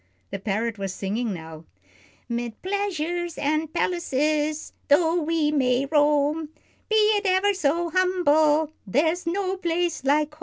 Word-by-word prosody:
The 195 Hz, -, -4 dB
parrot 215 Hz, +2 st, -2 dB
was 195 Hz, -1 st, -4 dB
singing 215 Hz, +4 st, -2 dB
now: 160 Hz, -3 st, -8 dB, 0.6 s
"'Mid 235 Hz, -1 st, -4 dB
pleasures 350 Hz, -4 st, -2 dB
and 310 Hz, +2 st, -1 dB
palaces, 305 Hz, -3 st, -1 dB
though 330 Hz, +3 st, +3 dB
we 315 Hz, -1 st, 0 dB
may 260 Hz, -2 st, +1 dB
roam, 295 Hz, +1 st, +2 dB, 0.4 s
Be 440 Hz, -, +1 dB
it 425 Hz, -1 st, +3 dB
ever 380 Hz, +2 st, +3 dB
so 335 Hz, 0 st, 0 dB
humble, 315 Hz, -4 st, +2 dB, 0.2 s
there's 320 Hz, -, 0 dB
no 380 Hz, +2 st, -1 dB
place 345 Hz, -4 st, -1 dB
like 295 Hz, +2 st, +1 dB
home. 305 Hz, -, -19 dB
310 Hz, 130 wpm, -24 LUFS, 275-350 Hz, 0.6 s, though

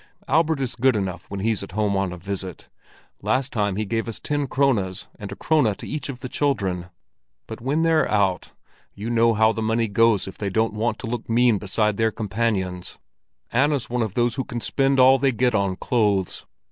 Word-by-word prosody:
Albert 160 Hz, -2 st, +2 dB
is 130 Hz, -3 st, -2 dB
good 130 Hz, 0 st, +3 dB
enough 95 Hz, -4 st, -3 dB
when 100 Hz, -1 st, -4 dB
he's 110 Hz, 0 st, 0 dB
at 100 Hz, -2 st, -8 dB
home 105 Hz, -1 st, +1 dB
on 95 Hz, -1 st, 0 dB
a 90 Hz, -, -7 dB
visit; 95 Hz, -1 st, -6 dB, 0.5 s
last 130 Hz, +1 st, 0 dB
time 105 Hz, -3 st, 0 dB
he 110 Hz, +2 st, -1 dB
gave 115 Hz, +2 st, -2 dB
us 115 Hz, -, -5 dB
ten 145 Hz, -1 st, -2 dB
krones 115 Hz, -9 st, 0 dB
and 100 Hz, -1 st, -7 dB
a -, -, -5 dB
krone 140 Hz, -9 st, +2 dB
to -, -, -9 dB
each 150 Hz, 0 st, -4 dB
of 125 Hz, -3 st, -6 dB
the 130 Hz, -, -4 dB
children. 95 Hz, -12 st, -1 dB, 0.6 s
But 110 Hz, +1 st, -8 dB
when 145 Hz, +6 st, 0 dB
they're 165 Hz, -1 st, +3 dB
out, 95 Hz, -4 st, +1 dB, 0.5 s
you 110 Hz, +4 st, -4 dB
know 115 Hz, -1 st, +3 dB
how 110 Hz, +1 st, +4 dB
the 110 Hz, -, -4 dB
money 110 Hz, +1 st, +1 dB
goes 110 Hz, -1 st, +3 dB
if 95 Hz, -, -9 dB
they 100 Hz, -, -1 dB
don't 110 Hz, +3 st, +1 dB
want 110 Hz, +1 st, -1 dB
to -, -, -5 dB
look 115 Hz, 0 st, -4 dB
mean 115 Hz, -2 st, +3 dB
beside 105 Hz, +1 st, 0 dB
their 110 Hz, 0 st, +3 dB
companions. 100 Hz, -4 st, -2 dB, 0.5 s
Anna's 135 Hz, 0 st, +1 dB
one 125 Hz, 0 st, 0 dB
of 110 Hz, -4 st, -2 dB
those 120 Hz, -1 st, +2 dB
who 130 Hz, -, -2 dB
can 120 Hz, -1 st, -5 dB
spend 135 Hz, +3 st, +1 dB
all 130 Hz, +1 st, +7 dB
they 135 Hz, 0 st, +3 dB
get 125 Hz, +1 st, +1 dB
on 100 Hz, -3 st, +1 dB
clothes. 100 Hz, -5 st, 0 dB
110 Hz, 210 wpm, -23 LUFS, 100-125 Hz, 0.6 s, all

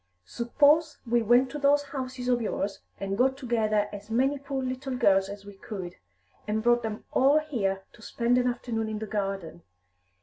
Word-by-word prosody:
Suppose 290 Hz, -, +2 dB
we 235 Hz, 0 st, +2 dB
went 245 Hz, +4 st, +4 dB
to 295 Hz, -, -5 dB
those 285 Hz, 0 st, +4 dB
houses 260 Hz, -3 st, -5 dB
of 245 Hz, -1 st, +2 dB
yours, 200 Hz, -2 st, -2 dB, 0.2 s
and 195 Hz, 0 st, -2 dB
got 260 Hz, +4 st, +2 dB
together 220 Hz, -5 st, +1 dB
as 205 Hz, +1 st, -9 dB
many 265 Hz, +5 st, +1 dB
poor 275 Hz, -1 st, -4 dB
little 255 Hz, 0 st, -3 dB
girls 195 Hz, -4 st, +3 dB
as 200 Hz, 0 st, -9 dB
we 205 Hz, -, -10 dB
could, 190 Hz, -3 st, -7 dB, 0.5 s
and 215 Hz, +1 st, -1 dB
brought 240 Hz, 0 st, +4 dB
them 220 Hz, -2 st, -5 dB
all 275 Hz, +3 st, +4 dB
here 210 Hz, -11 st, -1 dB
to 220 Hz, -, -17 dB
spend 240 Hz, +3 st, +1 dB
an 250 Hz, -, +1 dB
afternoon 230 Hz, -2 st, -2 dB
in 215 Hz, -, -3 dB
the 220 Hz, -, -4 dB
garden. 195 Hz, -5 st, -4 dB
235 Hz, 180 wpm, -27 LUFS, 205-265 Hz, 0.5 s, went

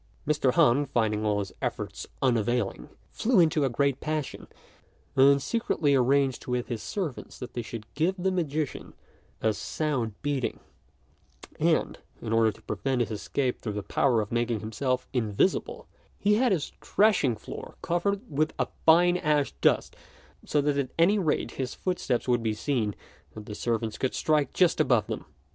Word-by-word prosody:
Mr. 145 Hz, -4 st, +2 dB
Han, 140 Hz, +5 st, +4 dB
finding 110 Hz, -4 st, 0 dB
all 105 Hz, -1 st, +1 dB
his 100 Hz, -1 st, -3 dB
efforts -, -, -4 dB, 0.2 s
unavailing, 120 Hz, -, 0 dB, 0.2 s
flew 235 Hz, -3 st, +2 dB
into 155 Hz, -3 st, +4 dB
a 135 Hz, -, +2 dB
great 140 Hz, +2 st, +1 dB
passion, 155 Hz, -2 st, -4 dB, 0.7 s
and 140 Hz, +1 st, +6 dB
secretly 170 Hz, -10 st, +1 dB
arranged 135 Hz, 0 st, +2 dB
with 125 Hz, 0 st, -2 dB
his 115 Hz, -3 st, -3 dB
servants 175 Hz, -11 st, -5 dB
that 125 Hz, -, -8 dB
they 120 Hz, -, -2 dB
should 115 Hz, -1 st, -7 dB
give 165 Hz, +6 st, +1 dB
the 190 Hz, +1 st, 0 dB
magician 155 Hz, -5 st, -3 dB, 0.5 s
a 110 Hz, -, +3 dB
sound 125 Hz, -2 st, -2 dB
beating; 145 Hz, -3 st, -1 dB, 1.0 s
and, -, -, +1 dB, 0.2 s
in 115 Hz, -1 st, -3 dB
order 115 Hz, -1 st, +4 dB
to -, -, -18 dB
prevent 130 Hz, -2 st, -1 dB
his 115 Hz, -2 st, -1 dB
escape 125 Hz, +4 st, -2 dB
through 105 Hz, -, -3 dB
the 105 Hz, 0 st, -4 dB
power 120 Hz, 0 st, +2 dB
of 105 Hz, -, -6 dB
making 120 Hz, -1 st, 0 dB
himself 125 Hz, +4 st, -2 dB
invisible, 115 Hz, -, 0 dB, 0.3 s
he 210 Hz, -, +2 dB
had 240 Hz, +2 st, +3 dB
his 165 Hz, -6 st, 0 dB
threshing 200 Hz, -, +3 dB
floor 105 Hz, -, -9 dB
covered 195 Hz, +4 st, 0 dB
with 155 Hz, 0 st, -1 dB
a -, -, -1 dB, 0.2 s
fine 175 Hz, +2 st, +6 dB
ash 150 Hz, -4 st, +1 dB
dust, -, -, +2 dB, 0.5 s
so 150 Hz, -, +1 dB
that 145 Hz, 0 st, +1 dB
at 130 Hz, -2 st, -1 dB
any 190 Hz, +6 st, +4 dB
rate 160 Hz, -6 st, 0 dB
his 130 Hz, -2 st, -4 dB
footsteps 155 Hz, -10 st, -1 dB
would 120 Hz, -1 st, +2 dB
be 110 Hz, -1 st, -1 dB
seen 110 Hz, -3 st, -1 dB, 0.4 s
and 105 Hz, -1 st, -8 dB
the 105 Hz, -, -7 dB
servants 115 Hz, 0 st, -2 dB
could 130 Hz, -, -1 dB
strike 150 Hz, -4 st, +1 dB
just 180 Hz, -2 st, +3 dB
above -, -, +3 dB
them. -, -, -5 dB
135 Hz, 165 wpm, -27 LUFS, 115-155 Hz, 1.0 s, and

